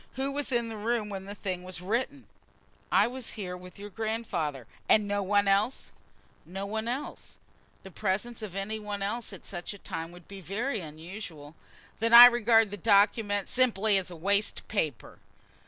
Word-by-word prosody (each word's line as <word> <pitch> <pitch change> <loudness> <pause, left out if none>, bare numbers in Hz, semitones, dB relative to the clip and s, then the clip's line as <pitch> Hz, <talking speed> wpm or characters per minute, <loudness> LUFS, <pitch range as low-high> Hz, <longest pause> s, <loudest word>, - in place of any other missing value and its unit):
Who 270 +1 -2
was 285 0 -2
in 235 -2 +1
the 225 -1 -6
room 220 0 -1
when 195 -1 -6
the 200 +1 -7
thing 185 -3 -4
was 185 -1 -5
written?" 240 +9 -2 0.7
"I - - +5
was 250 0 -4
here 185 -4 -5
with 180 0 -12
your 205 +1 -9
grandfather." 185 - -3 0.2
"And 210 -1 +5
no 205 0 0
one 200 +1 +2
else?" 200 +6 +1 0.5
"No 195 +3 -6
one 220 +2 -3
else. 260 +5 -5 0.5
The 190 - -11
presence 210 +6 -2
of 205 -4 -7
any 205 +3 -3
one 205 -1 -4
else 225 +4 -3
at 195 - -11
such 180 +2 -6
a - - -11
time 165 -3 -6
would 175 -1 -15
be 195 -1 -10
very 220 - -2
unusual." 160 -1 -9 0.5
"Then 230 +1 +4
I 240 +1 +14
regard 230 -3 +4
the 205 - -5
document 205 0 +3
simply 220 -5 +3
as 180 -1 -6
waste 200 +5 0
paper." 155 - -3
205 Hz, 175 wpm, -29 LUFS, 185-225 Hz, 0.7 s, I